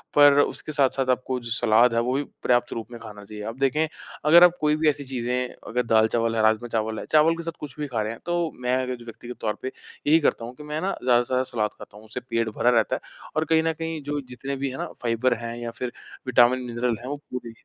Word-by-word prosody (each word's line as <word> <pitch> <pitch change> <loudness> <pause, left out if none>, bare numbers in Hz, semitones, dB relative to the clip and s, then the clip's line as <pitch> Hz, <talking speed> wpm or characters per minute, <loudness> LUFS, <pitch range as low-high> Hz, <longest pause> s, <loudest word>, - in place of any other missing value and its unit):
पर 145 -1 +7
उसके 155 - -2
साथ-साथ 135 -2 +1
आपको 130 0 0
जो 120 - -8
सलाद 120 0 +4
है, 115 - +2
वो 120 +2 0
भी 145 - 0 0.2
पर्याप्त 120 -1 +2
रूप 115 - -5
में 120 - -8
खाना 105 -2 -10
चाहिए। 105 0 -8
अब 115 +4 -6
देखें 150 +4 +2 0.4
अगर 170 +3 +8
आप 180 0 +6
कोई 150 0 +3
भी 155 0 +3
ऐसी 145 -1 -2
चीज़ें 125 0 -1 0.2
अगर 125 +2 0
दाल-चावल 115 +1 +2
है, 110 - +2
राजमा-चावल 110 0 +1
है, - - -6
चावल 155 +2 +5
के 170 - -5
साथ 165 -1 -5
कुछ 145 -3 -8
भी 150 - -2
खा 115 -4 -2
रहे 110 - -2
हैं 115 - -8
तो 175 -2 0
मैं 125 0 +1
अगर 125 0 -3
जो 120 -1 -13
व्यक्तिगत 120 +1 -9
तौर 105 -1 0
पे - - -4 0.4
यही 160 +2 +6
करता 120 -6 +1
हूँ 120 - -8
कि 150 - -11
मैं 150 +1 -4
ना 195 - 0
ज़्यादा 120 -1 +5
से - - -13
ज़्यादा 130 0 +1
सलाद 110 -5 -1
खाता 105 - -12
हूँ, 110 - -14
उससे 110 +3 -5
पेट 115 -2 -1
भरा 120 - +3
रहता 115 -3 +3
है - - -6 0.3
और 155 - +1
कहीं 160 0 +3
न 165 0 +1
कहीं 165 -1 -4
जो 145 +1 -2
जितने 135 +3 -5
भी 135 0 -2
हैं 130 - -6
ना - - -3
फाइबर 120 +1 +1
हैं 115 0 -5
या 120 -1 -5
फिर 120 +1 -4 0.4
विटामिन, 125 0 +5
मिनरल 120 0 -1
हैं, 125 - -9
वो 145 - -2 0.2
पूरे 125 -2 -5
125 Hz, 260 wpm, -25 LUFS, 115-145 Hz, 0.4 s, अगर